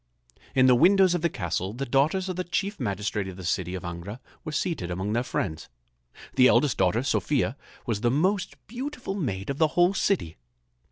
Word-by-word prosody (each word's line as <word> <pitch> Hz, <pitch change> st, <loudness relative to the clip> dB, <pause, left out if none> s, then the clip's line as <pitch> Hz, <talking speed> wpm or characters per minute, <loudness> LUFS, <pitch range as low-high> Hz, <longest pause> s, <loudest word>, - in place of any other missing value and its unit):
In 130 Hz, -1 st, +5 dB
the 130 Hz, -, +7 dB
windows 185 Hz, +7 st, +5 dB
of 175 Hz, -, 0 dB
the 170 Hz, -, +2 dB
castle 95 Hz, -, -3 dB
the 135 Hz, +4 st, -4 dB
daughters 150 Hz, +9 st, +1 dB
of 185 Hz, -, -3 dB
the 185 Hz, -, -2 dB
chief 200 Hz, +3 st, -2 dB
magistrate 105 Hz, -3 st, -2 dB
of 95 Hz, -1 st, -8 dB
the 95 Hz, -, -8 dB
city 90 Hz, +1 st, -1 dB
of 90 Hz, -, -6 dB
Angra 85 Hz, +6 st, -6 dB, 0.2 s
were 155 Hz, -, -5 dB
seated 150 Hz, -, -2 dB
among 95 Hz, +4 st, -2 dB
their 120 Hz, -, +2 dB
friends. 80 Hz, -9 st, -3 dB, 0.6 s
The 130 Hz, -, +6 dB
eldest 130 Hz, +3 st, +3 dB
daughter, 95 Hz, +6 st, +2 dB
Sophia, 135 Hz, -3 st, 0 dB, 0.3 s
was 110 Hz, -4 st, -2 dB
the 120 Hz, -, +3 dB
most 185 Hz, -, +1 dB
beautiful 250 Hz, -1 st, -5 dB
maid 115 Hz, -, -3 dB
of 140 Hz, -, -6 dB
the 160 Hz, -, +5 dB
whole 175 Hz, +2 st, +5 dB
city. 185 Hz, -, 0 dB
130 Hz, 190 wpm, -26 LUFS, -, 0.6 s, the